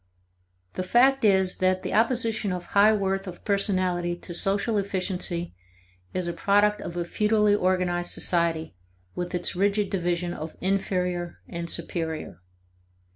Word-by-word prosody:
The - - -3
fact 250 +8 +3
is 190 -3 +3
that 185 0 +1
the - - -3
opposition 225 -2 +1
of 180 -1 -4
high 205 +2 +6
worth 195 -2 -1
of 180 - -9
personality 185 -4 0
to 175 0 -8
social 200 +4 +1
efficiency 185 -3 -2 0.6
is 185 -1 -2
a 170 - -2
product 205 +2 +2
of 175 - -6
a 175 - -1
feudally 210 +2 +2
organized 180 -3 0
society 165 - +1 0.4
with 180 0 -4
its 175 - -1
rigid 200 +2 +1
division 175 -2 -1
of 160 -1 -7
inferior 180 -2 -1
and 170 0 -5
superior. 160 - -4
185 Hz, 135 wpm, -26 LUFS, 175-205 Hz, 0.6 s, high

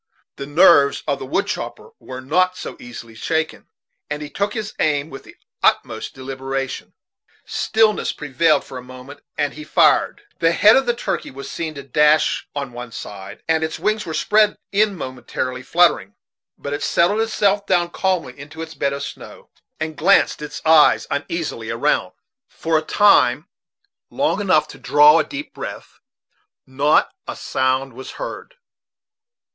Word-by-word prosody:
The 140 - -6
nerves 145 -2 +5
of 140 -2 0
the 135 - -7
wood 195 +8 0
chopper 460 - -6
were 130 0 -8
not 185 +7 +1
so - - -7
easily 120 -2 -10
shaken, 160 +8 -3 0.4
and 150 0 -4
he 145 - -9
took 200 +1 -2
his 215 -1 -4
aim 150 0 0
with 135 - -9
the - - -15 0.3
utmost - - 0
deliberation. 135 0 -5 0.5
Stillness 220 -1 +1
prevailed 150 +3 +1
for 130 - -8
a - - -9
moment, 130 +3 -12 0.2
and 145 -1 -1
he 150 - -9
fired. 410 - +2 0.2
The 165 0 +3
head 215 +5 +6
of 265 -1 +2
the 240 - +1
turkey 240 - -3
was 140 +1 -9
seen 160 -2 -4
to 140 - -7
dash 150 +3 +2
on 140 -4 -4
one 120 -1 -8
side, 100 -4 -9
and 160 0 +1
its 160 0 -3
wings 215 0 0
were 160 - -5
spread 210 0 +3
in 205 -1 +2
momentary 130 -2 -5
fluttering; 125 - +2 0.4
but 140 - -5
it 145 - -3
settled 205 +6 +2
itself 205 -2 +1
down 175 -2 +1
calmly 185 -10 -1
into 150 +3 -8
its 160 0 -9
bed 140 -3 -1
of 140 0 -5
snow, - - -10 0.3
and 155 0 -4
glanced 190 -1 +3
its 150 - -7
eyes 160 -1 +5
uneasily 145 -5 -3
around. 120 +6 0 0.4
For 165 0 -2
a 155 - +3
time 160 - +3 0.6
long 275 -8 0
enough 155 -6 +3
to - - -12
draw 150 +2 +6
a - - +2
deep 285 - -7
breath, - - -8 0.7
not 140 +3 +2 0.2
a - - -5
sound 130 0 -1
was 130 +2 -9
heard. - - -7
150 Hz, 160 wpm, -20 LUFS, 135-185 Hz, 0.7 s, head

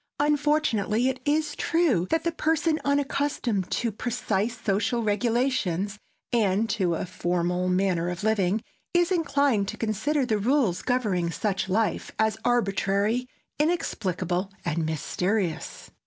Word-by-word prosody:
Unfortunately, 290 -6 +2
it 265 - -3
is 300 0 +1
true 290 - +2
that 325 0 +1
the 335 - +1
person 320 0 +1
unaccustomed 280 -8 0
to 235 -1 0
precise 230 0 -2
social 220 +3 0
regulations 210 -3 0 0.3
and 215 -1 +2
to 180 -6 +1
a - - -3
formal 180 0 -1
manner 180 -2 +1
of 175 +1 -5
living, 210 -1 +1 0.3
is 350 +1 +3
inclined 280 - +2
to - - -5
consider 235 +7 0
the 220 -4 0
rules 235 -5 +2
governing 210 -9 0
such 190 +2 -2
life 215 +3 0
as 220 0 +1
arbitrary, 215 0 +1 0.3
inexplicable 190 - -1
and 165 -2 0
mysterious. 175 +2 -2
220 Hz, 125 wpm, -26 LUFS, 190-275 Hz, 0.3 s, is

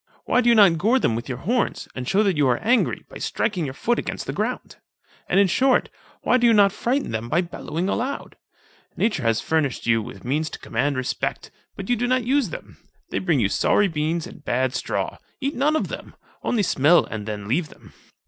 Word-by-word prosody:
why 250 - +3
do 240 - +3
you 235 - +6
not 195 -7 +6
gore 225 +9 +3
them 115 - +1
with 120 +3 -5
your 125 - -3
horns, 230 - -1
and 125 -1 -5
shew 200 +3 +3
that 195 -4 +1
you 145 -2 +3
arc 125 -1 +2
angry, 240 +3 +1
by - - -10
striking 185 -7 -1
your 135 - -5
foot 240 +9 0
against - - -4
the - - -4
ground? - - -3 0.5
And, - - +3
in 200 - +6
short, 255 +7 +2 0.3
why 250 - +4
do 240 -1 +4
not 200 -2 +5
you - - -14
frighten 265 +4 0
them 110 +1 -3
by 170 +6 +2
bellowing 175 0 -4
aloud? 255 +7 -3 0.6
Nature 210 -8 +1
has 115 -2 +1
furnished 155 -5 -1
you 115 -1 +3
with 100 -2 -10
means 150 +5 0
to - - -7
command 140 -1 -1
respect; 130 - -3 0.2
but 195 - -7
you 245 - +2
do 245 +1 -1
not 255 0 +2
use 260 -2 +1
them. - - -10 0.3
They - - 0
bring 170 -7 +1
you 105 - +3
sorry 205 - +2
beans 160 0 -1
and - - -12
bad 130 +1 0
straw; - - -3 0.2
eat 275 0 -2
none 290 +5 +2
of 315 - 0
them, - - -8 0.3
only 225 -4 0
smell 160 +1 +4
and 110 -1 -6
then 105 -2 -5
leave 150 +7 0
them. - - -17
175 Hz, 220 wpm, -23 LUFS, -, 0.6 s, you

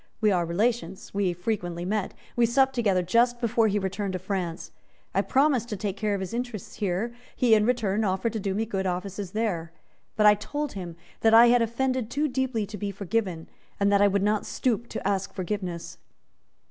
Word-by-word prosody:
We 215 -2 +3
are 175 -3 +1
relations; 195 0 -1
we 200 -2 +1
frequently 175 -2 -3
met; 205 0 -2 0.2
we 240 -1 +4
supped 265 +3 +3
together 200 -7 +2
just 240 +6 +2
before 230 -1 +2
he 205 0 +1
returned 195 0 -2
to - - -1
France; 185 -3 -4 0.4
I - - +3
promised 265 -4 +2
to 210 - -3
take 200 -1 -3
care 210 0 0
of 195 - -3
his 190 +3 -5
interests 240 -5 -5
here; 205 +4 -1 0.2
he 240 -3 +4
in 215 0 +4
return 220 -4 +1
offered 190 +3 0
to 220 - -2
do 195 -1 -2
me 220 +2 0
good 195 -3 -2
offices 185 +1 -4
there; 190 -7 -1 0.4
but 210 - +3
I 210 - +9
told 290 +8 -4
him 175 -4 -7 0.2
that 225 0 +5
I 235 +1 +9
had 245 0 +5
offended 250 +1 0
too 295 +4 0
deeply 260 -5 -1
to 210 +1 -8
be 205 - -2
forgiven, 195 -3 -2 0.3
and 200 0 +3
that 200 0 +4
I 205 - +6
would 200 0 +1
not 210 0 +1
stoop 235 -2 -1
to - - -4
ask 195 -1 -1
forgiveness." 185 -3 -4
210 Hz, 200 wpm, -26 LUFS, 190-235 Hz, 0.4 s, I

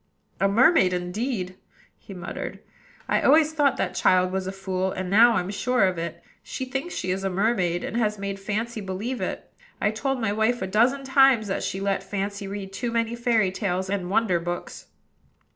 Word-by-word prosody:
"A 195 - +3
mermaid 210 - +4
indeed!" 185 +1 -3 0.4
he - - -14
muttered. 175 -1 -6 0.5
"I - - +2
always 310 +2 +5
thought 290 -3 +2
that - - -1
child 185 0 +3
was 190 0 -2
a - - -2
fool, 190 -1 -2
and 185 0 -4
now 230 +4 +7
I'm 185 -3 -1
sure 250 +3 +1
of 185 -2 -1
it. 170 0 -5 0.2
She 260 - -5
thinks 270 +7 -4
she 180 - -2
is 190 +1 -2
a 195 - 0
mermaid, 185 -3 0
and - - -4
has 215 -3 0
made 200 0 -4
Fancy 215 +3 -3
believe 205 +7 -4
it. - - -5 0.3
I've 210 - +1
told 270 +4 -1
my 220 -3 0
wife 220 +3 +1
a - - 0
dozen 235 +8 +2
times 270 -4 +4
that 190 - -1
she 190 - -3
let 195 -1 0
Fancy 200 +1 -4
read 195 -1 -6
too 235 +4 -3
many 230 0 0
fairy 230 -5 +2
tales 190 -1 -2
and 190 -3 -2
wonder 195 -3 +2
books. 175 +1 -6
200 Hz, 195 wpm, -25 LUFS, 185-235 Hz, 0.5 s, now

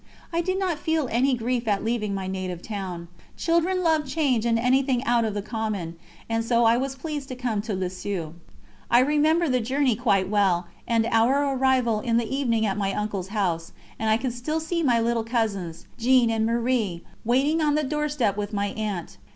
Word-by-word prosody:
I 335 - +2
did 370 +2 -1
not 365 -5 -1
feel 320 -2 0
any 255 +3 +2
grief 240 0 -2
at 205 -2 +1
leaving 215 -3 -1
my 190 -1 -3
native 185 -2 -4
town: 185 -5 -5 0.3
children 345 +2 +1
love 320 -2 +3
change 265 -5 0
and 230 -1 +3
anything 255 +1 +2
out 235 -3 +2
of 215 -2 -2
the 205 - -2
common, 210 -7 -3 0.3
and 225 0 0
so 235 0 +2
I 225 +1 +5
was 265 +2 -2
pleased 290 0 -5
to 255 - -6
come 240 -5 -1
to 210 -1 -3
Lisieux. 185 -3 -4 0.6
I 235 - +5
remember 300 +5 +3
the 255 -2 +2
journey 260 +1 +1
quite 200 -5 +1
well, 190 -4 +2 0.2
and 230 -1 +2
our 270 +5 +3
arrival 255 -4 +2
in 230 +1 +1
the 235 - +1
evening 230 -5 +1
at 200 0 -1
my 195 -1 0
uncle's 205 -3 -3
house, 180 -5 -2 0.3
and 220 - 0
I 220 - +4
can 255 +1 -2
still 275 +7 -2
see 335 +2 -2
my 245 -7 +3
little 230 0 +1
cousins, 210 -8 -2
Jeanne 245 -1 +4
and 220 0 +1
Marie, 230 -7 0 0.2
waiting 275 +7 +2
on 295 -1 +2
the 305 - +1
doorstep 295 -7 0
with 205 +1 -4
my 200 0 0
aunt. 205 -5 -4
235 Hz, 195 wpm, -25 LUFS, 205-270 Hz, 0.6 s, I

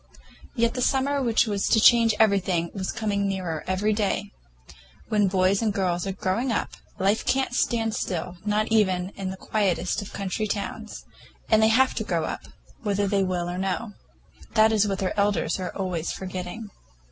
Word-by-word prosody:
Yet 235 -1 +2
the 250 - -3
summer 275 +2 +1
which 235 -3 +3
was 205 -3 -1
to 220 - +4
change 230 -1 +6
everything 190 -5 +2
was 190 -2 -3
coming 200 -3 -1
nearer 180 -5 -3
every 200 +3 +1
day. 205 -2 -1 0.8
When 210 -2 +3
boys 190 +1 +2
and 220 -2 +1
girls 185 -2 -1
are - - -1
growing 195 +7 -1
up, 225 - -1 0.3
life 200 +3 +1
can't 265 -2 0
stand 225 -2 +1
still, 180 -1 -3
not 210 +1 0
even 190 -4 +2
in 195 -1 -5
the 190 - -6
quietest 190 -3 0
of 205 - -9
country 200 +2 -3
towns; 215 +1 -5 0.5
and 220 0 +6
they 220 - +6
have 255 +4 +4
to - - -2
grow - - -1
up, - - -5 0.4
whether 205 -2 0
they 195 0 +1
will 180 -2 -1
or 175 +1 -4
no. 195 +3 -2 0.6
That 220 0 +6
is 210 -1 +3
what 195 -1 -1
their 190 -2 -1
elders 200 -1 +1
are 185 - -3
always 180 -4 -2
forgetting. 185 +3 -6
200 Hz, 180 wpm, -25 LUFS, 185-220 Hz, 0.8 s, change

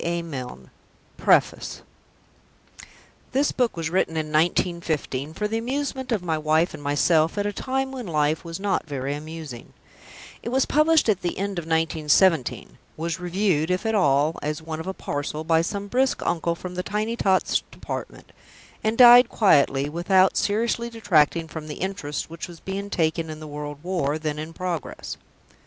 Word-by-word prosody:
A. 170 0 -1
Milne 125 - -7 0.5
PREFACE - - +2 1.5
This 280 +3 +2
book 245 -7 0
was 165 -1 -2
written 175 -2 +1
in 155 -1 -2
1915, 160 -3 0
for 210 - -1
the 225 +2 -1
amusement 265 +1 -3
of 210 -6 0
my 160 -3 -1
wife 155 +3 +2
and - - -8
myself 155 +4 +2
at 205 - 0
a 205 - -1
time 265 +4 -2
when 255 -5 -6
life 155 0 +1
was 165 +1 -6
not 195 -4 -1
very 140 -1 -3
amusing; 150 -4 -8 0.7
it - - -5
was 265 +2 +2
published 310 -1 +3
at 205 -4 +2
the 175 - -2
end 195 -1 -2
of 165 - -8
1917; 160 - +1 0.2
was 165 +3 -3
reviewed, 180 -3 0
if 180 +4 -1
at 225 - +1
all, 150 -4 +2
as 150 0 -2
one 160 0 -6
of 160 - -6
a 190 - -2
parcel, 145 +2 -4
by 160 0 +3
some 200 +4 -3
brisk 255 +5 0
uncle 170 0 0
from 180 +1 -7
the 180 - -2
Tiny 210 +4 -2
Tots 190 -5 +2
Department; - - -7 0.5
and 220 +1 0
died 245 -1 +9
quietly, 140 -8 +3
without 185 +4 +3
seriously 235 +3 0
detracting 170 -8 +2
from 160 -1 -7
the 150 - -6
interest 185 -7 -4
which 165 +2 -7
was 170 -2 -12
being 195 +1 -5
taken 160 -2 0
in 155 0 -7
the 155 - -8
World 145 -1 -6
War, 170 -5 -1
then 155 -1 -3
in 155 +1 -6
progress. 175 -4 -5
170 Hz, 170 wpm, -24 LUFS, 155-205 Hz, 1.5 s, died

